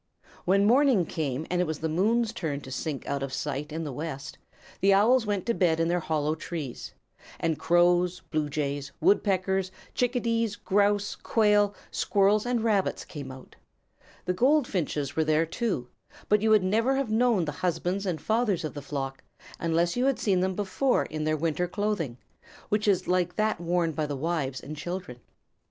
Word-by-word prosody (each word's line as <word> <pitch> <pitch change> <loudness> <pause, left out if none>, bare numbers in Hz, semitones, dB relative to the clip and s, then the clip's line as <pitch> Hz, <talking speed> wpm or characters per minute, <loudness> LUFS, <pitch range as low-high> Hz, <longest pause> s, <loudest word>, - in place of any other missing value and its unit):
When 195 +2 +4
morning 245 -4 +4
came 150 -2 -3
and 180 0 +2
it 180 - 0
was 155 -1 -2
the 160 - -2
moon's 220 +8 +1
turn 155 -10 -3
to 130 - -10
sink 145 +1 -4
out 140 -1 -2
of 135 -1 -3
sight 145 +2 -3
in 160 +2 -3
the 145 -4 -5
west, 145 -1 -6 0.4
the 195 0 +5
Owls 225 +3 +4
went 205 -3 -1
to 235 - +1
bed 170 -6 +2
in 165 0 +1
their 175 +1 +1
hollow 155 -2 0
trees, 155 -5 -6 0.4
and 165 -2 -1
Crows, 175 +2 +3
Blue 155 -3 0
Jays, 140 -1 -3
Woodpeckers, 190 -2 +2 0.2
Chickadees, 230 -3 0
Grouse, 205 +1 +1
Quail, 210 -2 +2 0.2
Squirrels, 205 +3 +2
and 240 -2 0
Rabbits 210 -4 +1
came 140 -4 -8
out. 130 0 -13 0.7
The 180 - 0
Goldfinches 185 - +1
were 160 - +2
there 155 +1 +2
too, 165 - -2 0.4
but 210 0 +3
you 220 - +2
would 215 -3 +5
never 225 +8 +2
have 270 -5 -1
known 225 -5 +3
the 150 - -2
husbands 180 +3 -1
and 170 -4 -1
fathers 215 -2 0
of 155 - -4
the 145 - -6
flock, 135 -1 -5 0.4
unless 170 +1 +1
you 250 +1 +1
had 275 - +2
seen 190 -4 +1
them 185 0 0
before 205 +7 +1
in 155 0 -4
their 155 0 +1
winter 165 +3 0
clothing, 180 - -2 0.5
which 210 0 0
is 195 -3 +2
like 180 -1 +1
that 215 -4 0
worn 170 -1 +1
by 155 -1 -2
the 145 -1 -3
wives 145 -3 -2
and 150 +3 -7
children. 175 -5 -6
180 Hz, 180 wpm, -27 LUFS, 155-210 Hz, 0.7 s, the